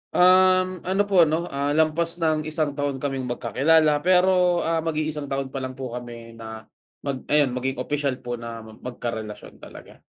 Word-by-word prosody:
Um, 185 0 +5
ano 190 +2 +2
po 190 -5 +4
ano, 165 +3 -2
ah, 140 +1 -1
lampas 160 +2 +1
ng 155 -2 0
isang 155 -1 -1
taon 145 -1 -2
kaming 135 -1 -3
magkakilala, 150 +5 +2
pero, 180 +1 +3
ah, 165 0 0
mag-iisang 155 -2 -2
taon 135 -1 -3
pa 135 - -4
lang 130 0 -5
po 130 -2 -6
kami 120 -1 -8
na 110 -1 -9 0.4
mag 140 -2 -4
ayun 145 -3 +3
maging 130 +1 -2
opisyal 140 +1 -1
po 120 -1 -4
na 115 -1 -7
mag 110 0 -14
magkarelasyon 115 -4 -6
talaga. - - -13
145 Hz, 170 wpm, -24 LUFS, 125-165 Hz, 0.4 s, Um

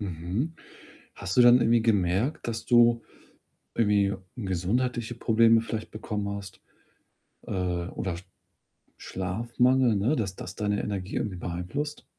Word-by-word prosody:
Mhm. 95 - -3 0.6
Hast 90 - -5
du 125 - +8
dann 120 +1 +8
irgendwie 115 0 +3
gemerkt, 105 - +1
dass 115 -1 -4
du 120 -1 +5 0.7
irgendwie 105 -3 +3 0.2
gesundheitliche 120 +4 -1
Probleme 115 0 +4
vielleicht 110 -1 -5
bekommen 105 -1 -4
hast, 100 -1 -9 0.9
äh, - - -8
oder 90 0 -2 0.8
Schlafmangel, 120 +6 +1
ne? 110 +10 +1
Dass 95 -7 -2
das 90 0 -8
deine 105 -1 -1
Energie 95 -2 -4
irgendwie 100 -3 -2
beeinflusst? 90 - -4
105 Hz, 120 wpm, -27 LUFS, 95-120 Hz, 0.9 s, du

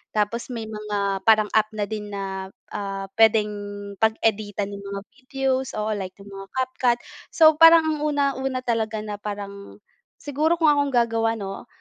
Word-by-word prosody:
tapos 215 +3 0
may 235 -3 -5
mga 205 -2 -2
parang 215 -2 +5
app 215 -1 +3
na 210 - -1
din 210 0 -5
na, 195 -1 -5 0.2
ah, 195 -1 -4
p'wedeng 220 -1 +5 0.5
pag-editan 215 -2 0
nung 200 0 -7
mga 200 - -4
videos, 265 0 -2
oo 215 0 -1
like 190 -3 -4
ng 200 0 -13
mga 195 0 -9
CapCut. 255 -2 +1 0.4
So, 315 -2 +6
parang 330 0 +9
ang 310 -1 -1
una-una 275 -3 -1
talaga 220 -3 -1
na 210 -1 -6
parang 200 -1 -7 0.4
siguro 300 +4 0
kung 325 -3 +4
akong 285 -1 +2
gagawa 230 -1 +2
'no? 195 -3 -7
220 Hz, 160 wpm, -24 LUFS, 205-260 Hz, 0.5 s, parang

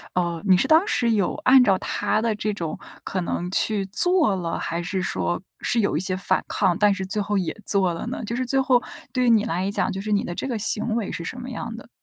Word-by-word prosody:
呃， 170 -2 -1
你 185 -1 +6
是 - - +1
当 320 +4 +5
时 235 - +1
有 205 -5 0
按 260 0 +7
照 195 -5 +3
她 215 - -1
的 225 -1 0
这 210 0 -2
种 170 -6 -5 0.3
可 185 - -3
能 175 0 -3
去 205 0 +2
做 320 - +3
了？ 170 -3 -3
还 170 +1 -3
是 185 +2 -3
说 85 - -1 0.2
是 240 - +1
有 200 - 0
一 - - +1
些 185 +1 -1
反 195 - 0
抗， 190 -4 +1
但 210 -1 +4
是 195 -1 -2
最 210 +3 -2
后 205 0 -1
也 180 -4 -2
做 190 -3 +5
了 165 - -6
呢？ 245 -1 -5
就 230 - -4
是 255 +1 -2
最 270 +2 +2
后 255 -2 +3 0.3
对 255 -1 +1
于 - - +4
你 225 -3 +4
来 180 +4 -2
讲， 200 - -1
就 195 - -5
是 215 - -5
你 205 - +2
的 175 - -5
这 220 - -4
个 245 -4 -2
行 220 +1 +1
为 225 -4 -2
是 170 - -5
什 245 - -6
么 250 +1 -7
样 230 -1 -6
的？ - - -12
205 Hz, 280 characters per minute, -23 LUFS, 185-235 Hz, 0.3 s, 按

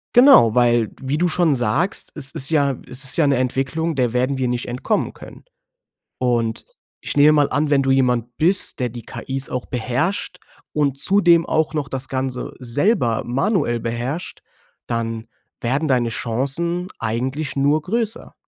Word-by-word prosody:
Genau, 245 - +7
weil, 120 -2 +2
wie 135 +2 -2
du 175 +3 +2
schon 170 -3 +2
sagst, 130 - -1
es 140 -2 -1
ist 135 +4 +2
ja 140 -4 +2
es 125 - -2
ist 130 -2 +2
ja 165 - +3
'ne 140 -1 +3
Entwicklung, 135 +6 -1
der 125 -3 0
werden 130 +2 0
wir 130 -1 -1
nicht 120 0 -3
entkommen 125 +1 -2
können. - - -13 0.8
Und, 120 -3 -1 0.4
ich - - -6
nehme 145 +1 +7
mal 145 -2 +2
an, 145 +3 0
wenn 140 -2 +3
du 135 - +1
jemand 125 -2 +1
bist, 180 -2 +2
der 125 - 0
die 120 0 -9
KI's 135 +3 -5
auch 125 - -4
beherrscht 145 - -2 0.3
und 140 -3 0
zudem 170 -1 +5
auch 160 -1 0
noch 145 -2 -2
das 130 0 -3
Ganze 130 -1 -4
selber 125 - 0
manuell 135 - 0
beherrscht, 120 +8 -5 0.5
dann 115 -1 -3 0.3
werden 135 +6 -1
deine 125 -4 +1
Chancen 140 +11 0
eigentlich 130 +6 -3
nur 145 +3 +1
größer. 220 +5 -3
135 Hz, 160 wpm, -20 LUFS, 120-155 Hz, 0.8 s, Genau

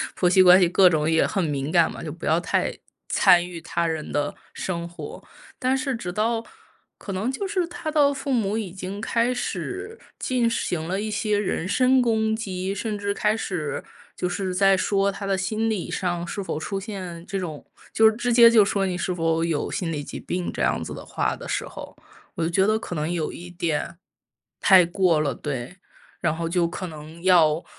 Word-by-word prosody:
婆 180 - +2
媳 185 +1 +6
关 180 0 +8
系 175 - +4
各 185 +1 +6
种 155 -1 +1
也 160 - +3
很 195 -3 -1
敏 145 -3 -2
感 170 -1 +3
嘛， - - -8
就 - - -5
不 - - -8
要 - - +3
太 - - 0 0.4
参 175 -1 +5
与 175 -1 -7
他 170 +1 -2
人 160 -2 -3
的 145 0 0 0.2
生 170 -2 -3
活。 170 - -9 0.4
但 260 +1 +1
是 275 -1 -2
直 205 -7 -5
到 225 +3 0 0.6
可 200 - -7
能 195 +5 -1
就 270 +10 -3
是 375 -3 -1
他 340 -2 -5
的 290 -2 +4
父 275 0 -4
母 220 -4 +1
已 210 -5 -4
经 190 +2 -6
开 235 +2 +1
始 395 - -4 0.2
进 245 -2 +1
行 175 -8 -2
了 190 +3 -1
一 215 0 -3
些 210 0 0
人 185 -4 -1
身 255 +5 +4
攻 220 -2 +1
击， 195 -3 -3
甚 210 +1 -3
至 200 0 -2
开 210 +1 +1
始 175 -9 -3 0.3
就 180 - -2
是 185 0 -3
在 195 0 +4
说 200 +1 +1
他 200 +1 -7
的 195 -1 0
心 215 +4 -1
理 210 -5 -3
上 175 -2 -2
是 200 +4 -4
否 190 - -4
出 195 +5 -3
现 185 -5 -7
这 195 - -3
种 160 -5 -6 0.3
就 220 0 +6
直 240 +2 -1
接 235 0 +9
就 225 -3 +6
说 200 0 0
你 180 -2 -2
是 180 +1 -1
否 165 -1 0
有 165 -3 -1
心 170 -3 -2
理 145 -1 -3
疾 - - -7
病 180 0 -3
这 - - -5
样 - - +1
子 - - -7
的 - - -9
话 - - -1
的 - - -9
时 - - -2
候， - - -10 0.4
我 170 - -2
就 165 - 0
觉 190 +3 +3
得 215 0 +2
可 180 - -6
能 155 +1 -2
有 165 -3 -2
一 175 +1 -9
点 170 -2 -2 0.6
太 190 -2 +7
过 175 -2 +2
了。 140 -3 0
对， 135 +3 -5 0.4
然 155 - 0
后 165 0 -3
就 170 0 +2
可 175 +2 -5
能 155 +1 -10
要， 170 -4 +4
185 Hz, 230 characters per minute, -24 LUFS, 170-220 Hz, 0.6 s, 接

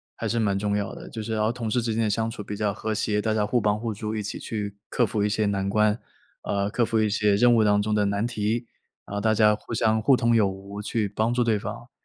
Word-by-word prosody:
还 - - -5
是 115 - 0
蛮 100 -3 +1
重 105 0 0
要 100 - -3
的。 - - -10
就 110 - -6
是 110 +1 -4
然 110 - 0
后 110 - +2
同 120 -2 -4
事 125 +2 +1
之 115 -1 -1
间 115 +1 +1
的 - - +1
相 110 +2 0
处 115 - -7
比 105 0 -6
较 105 -1 0
和 110 +1 -3
谐， 105 0 0
大 110 0 0
家 105 -1 +1
互 120 +3 +1
帮 105 -1 +1
互 115 0 -3
助， 110 +1 -4
一 105 - -2
起 100 - -5
去 100 -2 -5
克 120 - +1
服 105 0 -2
一 105 - +2
些 105 0 0
难 100 -1 -1
关， 105 +1 +2 0.4
呃， 100 0 -1
克 120 +2 +1
服 115 0 0
一 110 - +2
些 105 0 +2
任 120 +3 +5
务 115 - +4
当 105 0 +3
中 105 +1 -1
的 105 -1 +2
难 100 +2 0
题， 115 0 -1 0.4
然 - - -9
后 100 - -1
大 110 +1 +2
家 105 -1 +5
互 110 - -7
相 110 0 +2
互 130 +5 +5
通 120 -1 +2
有 110 -3 +4
无 100 +2 -8
去 105 0 -1
帮 110 +4 0
助 120 0 +2
对 110 -3 +1
方， 115 +4 -7
110 Hz, 315 characters per minute, -25 LUFS, 105-115 Hz, 0.4 s, 任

